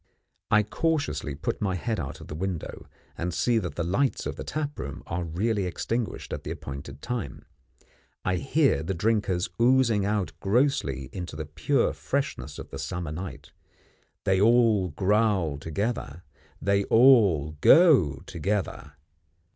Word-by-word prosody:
I 105 0 +5
cautiously 105 - -1
put 75 - -3
my 95 -3 0
head 110 +4 -2
out 75 0 -5
of 80 - -11
window, 85 +2 -4 0.3
and 90 +1 -3
see 115 +7 +2
that 85 -8 -5
the 85 - -1
lights 100 +11 0
of - - -3
the - - -6
tap 150 -1 -4
room 70 - -6
are 85 +1 -3
really 95 +4 -1
extinguished 115 +6 -3
at - - -5
the - - -6
appointed 70 0 -7
time. 115 - -4 0.8
I 95 -1 +1
hear 135 - +2
the 95 +4 -3
drinkers 100 -2 0
oozing 120 -4 +4
out 105 -1 0
grossly 95 - 0
into 90 -4 -6
the 80 0 -4
pure 75 +1 0
freshness - - -3
of - - -9
the 70 - -6
summer 75 +4 -4
night. 75 -5 -7 0.7
They 95 0 +2
all 115 -4 +4
growl 95 -3 +1
together; 85 - -3 0.4
they 100 0 +2
all 110 - +5
go 125 - +6
together. 100 -1 -3
95 Hz, 145 wpm, -27 LUFS, 80-115 Hz, 0.8 s, go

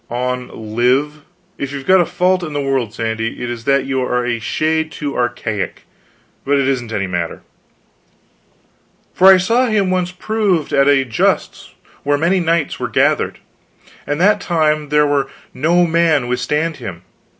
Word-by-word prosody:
"On 125 -3 -4
live. 135 +6 +1 0.4
If 140 -1 -3
you've 140 -1 -6
got 185 -1 +5
a 175 - 0
fault 185 +1 +1
in 155 -4 -5
the 145 - -1
world, 135 -5 -1
Sandy, 115 +1 -3
it 120 - -3
is 115 -1 -7
that 140 -1 +2
you 135 -1 -1
are 125 -1 -1
a 120 -1 -1
shade 160 +6 -1
too 145 -3 -5
archaic. 120 -5 -3 0.6
But 140 +1 +1
it 135 -1 +1
isn't 125 -4 -2
any 100 -3 -1
matter." 85 -3 -4 0.8
" - - -39
for 190 +1 +7
I 190 - +7
saw 230 +7 +2
him 205 -4 +1
once 180 -1 0
proved 190 -4 -1
at 140 0 +4
a 140 -2 +4
justs 115 -3 -1 0.3
where 145 0 +1
many 170 +5 +2
knights 165 -3 0
were - - -3
gathered, - - +1 0.7
and 145 +1 -2
that 205 +4 +3
time 155 -3 0
there 150 0 +3
might 145 -2 +1 0.3
no 170 +5 +2
man 165 -5 +2
withstand 150 +6 -1
him. 90 -1 -8
145 Hz, 170 wpm, -17 LUFS, 125-170 Hz, 0.8 s, for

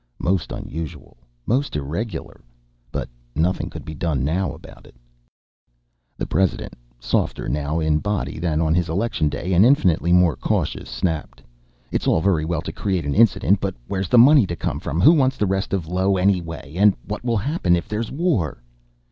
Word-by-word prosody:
Most 95 -1 -1
unusual. 80 -1 -7 0.3
Most 135 - 0
irregular. 80 +6 -5 0.5
But - - -3 0.3
nothing 85 +5 0
could - - -9
be 80 - -6
done 75 -4 -1
about 90 +5 -4
it - - -19
now. - - -29 1.2
The - - -2
President, 95 +3 0 0.3
softer - - -1
now 75 +4 -1
in 80 -1 +1
body 105 -3 -3
than 80 -2 0
on 80 -1 +2
his 85 0 +1
election 85 -3 0
day, 85 +6 -3
and 90 +3 +6
infinitely 90 - +3
more 90 -2 +4
cautious, - - -2
snapped: 80 -4 -3 0.5
"It's - - -1
all - - +3
very 80 -3 +1
well 80 -1 -1
to - - -5
create 95 -5 -2
an 70 - -1
incident. 105 -2 +4
But 95 -1 -3
where's 95 -2 -3
the 125 - +4
money 130 -2 +7
to 85 - -3
come - - -3
from? 80 +5 -2
Who 155 - +8
wants 135 -4 +2
the 105 - +1
rest 95 +1 -1
of 95 -5 -2
Io 95 +3 +1
anyway? 85 -6 -1
And 100 0 +5
what 105 +3 -5
will 120 -2 +1
happen 100 - +1
if 85 - -3
there's 105 +1 -3
war?" 135 - -1
90 Hz, 180 wpm, -22 LUFS, 80-105 Hz, 1.2 s, Who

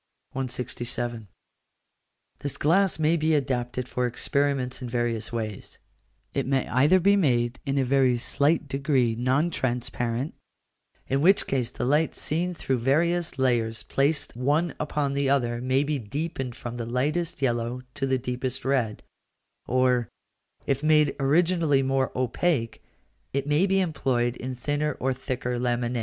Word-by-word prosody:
167. 120 -3 -3 1.1
This 145 0 -4
glass 190 +6 +3
may 160 +1 +3
be 160 -1 +2
adapted 125 -3 -1
for 125 0 -1
experiments 135 +1 -1
in 125 - -5
various 120 -2 -1
ways: 110 -4 -5 0.6
it - - -1
may 135 -1 +1
either 145 +9 +4
be 200 +3 +4
made 125 -9 +1
in 135 +1 0
a 135 - +2
very 130 -1 +3
slight 145 +5 +1
degree 135 -3 +1
non 130 +8 +1
transparent, 120 0 -2 0.7
in 135 +1 +1
which 195 +5 +5
case 125 -4 -1
the - - -4
light 150 +5 +2
seen 175 +3 -1
through 130 -5 -1
various 165 +6 +1
layers 120 -4 +1
placed 140 0 0
one 145 +7 +1
upon 145 -2 -1
the 140 -1 +1
other 120 -4 +1
may 130 +2 +2
be 145 -1 -1
deepened 135 - -4
from 120 0 -6
the 120 - -3
lightest 150 +8 -1
yellow 120 -1 -1
to 135 -2 -2
the 130 0 +2
deepest 125 +1 -3
red, 125 -6 0 0.6
or, 125 -2 +2 0.6
if 135 0 0
made 155 -1 +3
originally 155 0 +3
more 135 0 +1
opaque, 130 0 -1 0.5
it 140 0 -1
may 150 +6 +2
be 195 0 +2
employed 130 -9 0
in 130 0 -5
thinner 145 +3 -1
or 130 0 -1
thicker 125 -1 -3
laminæ. 120 0 0
130 Hz, 145 wpm, -26 LUFS, 120-150 Hz, 1.1 s, which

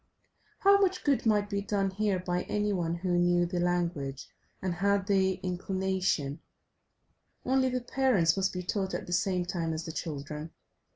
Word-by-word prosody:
How 400 +1 +6
much 380 -2 +1
good 275 -5 +2
might 210 -2 +3
be 200 -1 -2
done 200 -1 0
here 200 0 0
by 180 0 -1
any 210 0 0
one 170 -3 -1
who 175 0 0
knew 175 0 +3
the 175 0 -2
language 170 -6 -1 0.3
and 185 -2 -2
had 200 +2 +1
the 190 -2 +3
inclination, 185 -5 -1 1.1
only 260 0 +3
the 250 0 -1
parents 240 -10 +2
must 195 -1 +1
be 180 0 -4
taught 190 +1 -2
at - - -4
the 175 - -4
same 180 -1 +1
time 170 -2 -2
as 160 +1 -4
the 160 - -4
children. 150 -1 -5
185 Hz, 170 wpm, -30 LUFS, 175-205 Hz, 1.1 s, How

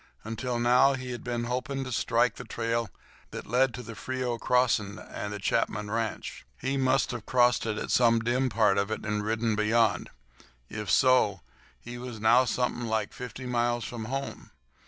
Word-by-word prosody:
Until 115 +3 -3
now 125 +3 +4
he 130 -1 -5
had 120 - -6
been 120 -1 -2
hoping 130 +3 -2
to 130 - -6
strike 115 - +1
the - - -7
trail 115 -1 -2 0.4
that - - -7
led 125 +3 +2
to 125 - -7
the 115 0 -8
Frio 125 +1 -3
crossing 115 -5 +1
and 105 -1 -6
the 105 - -4
Chapman 105 0 -1
ranch. 115 -1 -3 0.2
He 135 +1 -1
must 135 0 +2
have 120 -3 -7
crossed 125 -2 +3
it 110 -1 -2
at - - -4
some 115 -2 +4
dim 125 +3 +1
part 105 -4 +3
of 100 +1 -1
it 110 - -4
and 105 0 -1
ridden 110 +1 0
beyond. 110 -2 +2 0.6
If 105 -2 -5
so 125 - +4 0.4
he 120 +1 -8
was 120 -3 -7
now 120 +4 +5
something 125 0 -1
like 110 -2 -1
fifty 125 +1 -7
miles 120 -1 0
from 115 -2 -6
home. 135 +3 -5
120 Hz, 180 wpm, -28 LUFS, 110-125 Hz, 0.6 s, now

